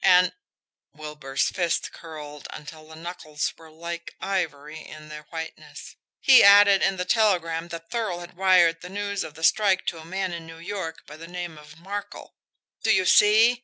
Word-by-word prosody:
And" 180 0 +5 0.6
Wilbur's 150 -3 -3
fist 175 -3 -1
curled 150 -3 -10
until 155 +1 -10
the 160 - -12
knuckles 160 -2 -5
were 160 -1 -16
like 170 +2 -7
ivory 160 -6 -3
in 155 -1 -12
their 150 -1 -10
whiteness 160 -1 -8 0.2
"he 265 -2 +7
added 200 -1 +7
in 195 - +1
the 180 - -2
telegram 175 -6 +1
that 165 -1 -9
Thurl 215 -7 -2
had 175 0 -11
wired 175 -3 +4
the 180 - -9
news 200 0 -3
of 160 -1 -9
the 160 - -10
strike 195 +1 +3
to 165 - -3
a 160 - -11
man 190 +1 -3
in 165 -1 -7
New 165 0 -11
York 170 -2 -6
by 150 - -11
the 165 +1 -10
name 175 -2 -6
of 150 +1 -15
Markel. 200 +4 -7 0.5
Do 220 - +2
you 190 -3 +3
see? 220 +6 +5
170 Hz, 180 wpm, -25 LUFS, 160-190 Hz, 0.6 s, he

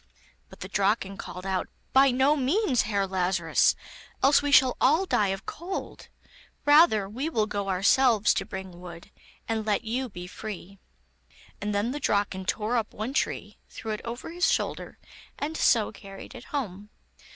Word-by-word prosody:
But - - -15
the - - -5
Draken 195 0 0
called 180 +1 -8
out: 190 -1 -2 0.2
'By 270 +1 +6
no 265 +4 +3
means, 275 - +1
Herr 200 -2 +1
Lazarus, 180 -3 +2 0.5
else 275 +2 +6
we 290 0 -1
shall 260 -2 +6
all 315 +8 +4
die 210 - +2
of 195 0 -3
cold; 360 +4 -6 0.6
rather 290 - +5
will 260 +10 -4
we 220 -7 +1
go 200 -2 -3
ourselves 215 +4 +4
to - - -1
bring 190 -3 -8
wood, 175 +2 -11 0.4
and 225 -1 -1
let 210 +1 0
you 245 +3 -2
be 180 -3 -8
free.' 200 0 -8 0.8
And 205 0 -2
then 210 +4 0
the 290 - -4
Draken 200 -6 0
tore 220 +5 0
up 220 -2 -3
one 220 +5 -4
tree, - - -2
threw 220 - -6
it 215 - -4
over 240 +6 -6
his 355 +2 +2
shoulder, - - -2 0.4
and 310 +2 -3
so 230 -8 +3
carried 195 +2 -11
it 250 -1 -11
home. 210 -8 -5
215 Hz, 165 wpm, -27 LUFS, 195-265 Hz, 0.8 s, By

